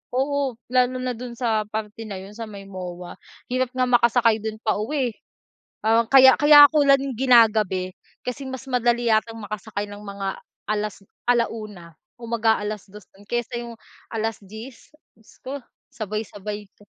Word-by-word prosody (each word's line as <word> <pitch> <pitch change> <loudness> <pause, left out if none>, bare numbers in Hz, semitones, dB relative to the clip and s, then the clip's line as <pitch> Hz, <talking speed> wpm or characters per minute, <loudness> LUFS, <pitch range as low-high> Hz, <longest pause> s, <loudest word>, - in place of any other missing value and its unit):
Oo, 275 -1 0 0.2
lalo 255 0 +2
na 255 - -1
dun 245 -1 -7
sa 225 -3 0
parte 215 +1 -6
na 200 - -6
yun, 195 +2 -11
sa 225 +1 -7
may 200 -2 -9
MOA, 180 -2 -8 0.3
hirap 255 0 +1
nga 255 0 +2
makasakay 235 -2 +4
dun 220 0 -4
pauwi, 240 +4 0
eh. - - -21 1.0
Kaya 265 -1 +9
kaya 290 0 +10
'ko 305 -2 +3
lang 275 -1 +6 0.2
ginagabi 215 -7 +4 0.3
kasi 250 +3 -4
mas 260 0 -7
madali 240 -1 +1
yatang 220 +1 +1
makasakay 205 0 -5
ng 205 0 -9
mga 200 -1 -5 0.3
alas 210 -1 -1 0.3
1:00 215 -8 -1 0.2
o 235 - -9
mag-a-alas 215 -3 0
dos 210 -2 -12 0.2
kaysa 240 0 -2
yung 235 -1 -8 0.4
10:00, 220 +2 -6 0.3
dios 220 - -22
ko, 280 +1 -5 0.3
sabay-sabay 210 -1 -5
'to. 205 - -21
225 Hz, 145 wpm, -23 LUFS, 210-250 Hz, 1.0 s, kaya